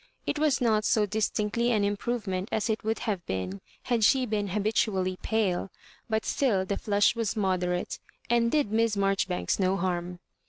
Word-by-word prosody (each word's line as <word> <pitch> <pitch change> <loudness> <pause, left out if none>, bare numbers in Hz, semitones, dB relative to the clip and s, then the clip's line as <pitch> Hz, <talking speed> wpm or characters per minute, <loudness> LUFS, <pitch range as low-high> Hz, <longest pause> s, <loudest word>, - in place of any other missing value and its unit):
It 290 - -1
was 300 -3 +2
not 220 -4 +2
so 215 -1 +3
distinctly 215 +3 0
an 215 -3 +2
improvement 205 -2 -2
as 220 +1 0
it 220 - -3
would 220 +1 0
have 200 -6 -1
been 95 +1 -3 0.2
had 235 -3 0
she 260 +4 +4
been 210 -3 -1
habitually 195 -2 0
pale; 200 -4 0 0.4
but 220 -1 0
still 210 -9 +1
the 200 - -1
flush 205 +2 +2
was 230 -3 -1
moderate, 180 -3 -1 0.3
and 235 0 +3
did 295 -9 +1
Miss 225 -1 +2
Mar 195 0 +3
joribanks 185 0 -1
no 190 0 +2
harm. 180 -1 -2
210 Hz, 170 wpm, -28 LUFS, 190-225 Hz, 0.4 s, she